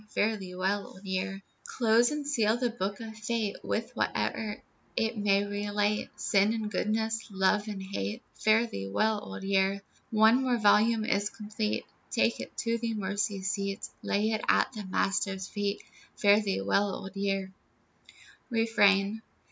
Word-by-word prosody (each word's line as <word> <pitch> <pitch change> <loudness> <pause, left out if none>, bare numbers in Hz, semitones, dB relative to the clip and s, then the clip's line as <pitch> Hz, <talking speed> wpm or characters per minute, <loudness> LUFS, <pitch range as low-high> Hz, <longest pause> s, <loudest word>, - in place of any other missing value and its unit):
Fare 220 +1 +2
thee 185 -3 -8
well, 195 +2 0
Old 190 - -14
Year. 190 +1 -3 0.2
Close 235 0 +3
and 300 -1 -3
seal 230 -6 +2
the 245 -1 0
book 200 -3 -3
of 220 -1 -7
fate, 215 -1 -2
With - - -2
whate'er 210 -2 -1 0.4
it 225 +1 +1
may 200 -1 +2
relate, 205 +1 -1
Sin 200 +2 +3
and 215 -2 -3
goodness, 220 +3 -1
love 200 +2 +2
and 200 -2 -5
hate, 105 - -4
Fare 220 +2 +3
thee 95 - -5
well, 215 - +1
Old - - -7
Year. 195 0 +1 0.3
One 220 +3 +5
more 255 -2 +1
volume 215 +1 +4
is 200 0 +1
complete, 210 0 -3 0.2
Take - - +1
it - - -8
to 230 -1 0
the 230 -1 -2
Mercy 205 -1 -2
Seat, 195 +1 -2
Lay 210 +2 +1
it 215 -1 0
at - - +3
the 215 -3 -6
Master's 195 0 0
feet, 205 0 -2 0.3
Fare 205 0 +5
thee 200 - -1
well, 195 - +2
Old 195 0 -8
Year. 195 -1 -1 1.0
REFRAIN. 215 -3 +3
205 Hz, 155 wpm, -29 LUFS, 195-220 Hz, 1.0 s, One